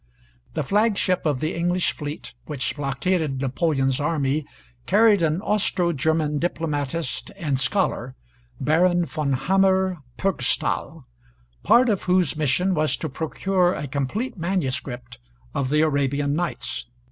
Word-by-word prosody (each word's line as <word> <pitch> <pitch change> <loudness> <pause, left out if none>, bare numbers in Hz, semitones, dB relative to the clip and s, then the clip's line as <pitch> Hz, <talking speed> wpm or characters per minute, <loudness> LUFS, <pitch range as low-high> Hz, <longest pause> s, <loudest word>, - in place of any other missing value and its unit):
The 155 - 0
flagship 195 -1 +1
of 145 -4 0
the 155 +2 -1
English 175 +1 0
fleet 150 0 -6
which 150 -2 -2
blockaded 145 +1 -1
Napoleon's 135 0 0
army 150 -1 0 0.4
carried 215 -4 +5
an 160 0 +1
Austro 190 -5 +1
German 150 0 0
diplomatist 160 -3 -2
and 145 -8 -1
scholar, 130 -3 0 0.4
Baron 175 +4 +3
von 150 -4 -2
Hammer 190 +5 +2 0.2
Purgstall, 195 -1 -1 0.6
part 250 +2 +5
of 205 -4 +1
whose 180 -5 +2
mission 155 +6 +1
was 155 -2 +1
to 160 - -4
procure 175 +5 0
a 145 - -4
complete 150 - -3
manuscript 135 - -3 0.3
of 130 -2 -1
the 150 +2 +3
'Arabian 140 -1 +1
Nights.' 145 -8 -3
155 Hz, 125 wpm, -24 LUFS, 140-185 Hz, 0.6 s, carried